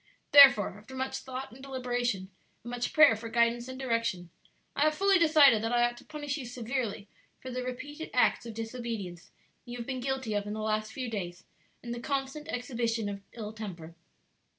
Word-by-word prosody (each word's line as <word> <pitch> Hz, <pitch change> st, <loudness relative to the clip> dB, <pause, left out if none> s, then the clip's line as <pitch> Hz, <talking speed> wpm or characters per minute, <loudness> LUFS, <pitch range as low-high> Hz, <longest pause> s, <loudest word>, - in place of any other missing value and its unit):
"Therefore, 270 Hz, -8 st, +9 dB
after 225 Hz, +5 st, -12 dB
much 265 Hz, 0 st, -2 dB
thought 260 Hz, 0 st, -7 dB
and 255 Hz, +3 st, -13 dB
deliberation, 245 Hz, -7 st, -2 dB, 0.3 s
and 240 Hz, -, -7 dB
much 245 Hz, 0 st, -2 dB
prayer 305 Hz, -7 st, +7 dB
for 225 Hz, +1 st, -7 dB
guidance 235 Hz, +1 st, +2 dB
and 260 Hz, 0 st, -7 dB
direction, 230 Hz, -9 st, -1 dB, 0.4 s
I -, -, -1 dB
have 305 Hz, +1 st, +4 dB
fully 390 Hz, +1 st, +4 dB
decided 300 Hz, -8 st, +6 dB
that 225 Hz, +1 st, -1 dB
I 240 Hz, 0 st, +3 dB
ought 240 Hz, 0 st, +1 dB
to -, -, -13 dB
punish 295 Hz, -1 st, -4 dB
you 270 Hz, -, -6 dB
severely 235 Hz, -3 st, -3 dB, 0.3 s
for 260 Hz, -, -8 dB
the 255 Hz, 0 st, -3 dB
repeated 275 Hz, +5 st, -6 dB
acts -, -, +2 dB
of 225 Hz, -, -7 dB
disobedience 225 Hz, -6 st, -5 dB, 0.3 s
you 240 Hz, 0 st, -7 dB
have 235 Hz, -, -5 dB
been 260 Hz, 0 st, -3 dB
guilty 260 Hz, -3 st, -2 dB
of 205 Hz, 0 st, -1 dB
in 205 Hz, -, -3 dB
the 215 Hz, -, -5 dB
last 215 Hz, 0 st, -1 dB
few 255 Hz, +1 st, -4 dB
days, 185 Hz, -6 st, -5 dB, 0.4 s
and 240 Hz, -1 st, -4 dB
the 240 Hz, -, -5 dB
constant 275 Hz, +3 st, -3 dB
exhibition 235 Hz, -3 st, -2 dB
of 200 Hz, -1 st, -6 dB
ill 215 Hz, -2 st, -6 dB
temper. 180 Hz, -7 st, -8 dB
240 Hz, 195 wpm, -30 LUFS, 220-265 Hz, 0.4 s, Therefore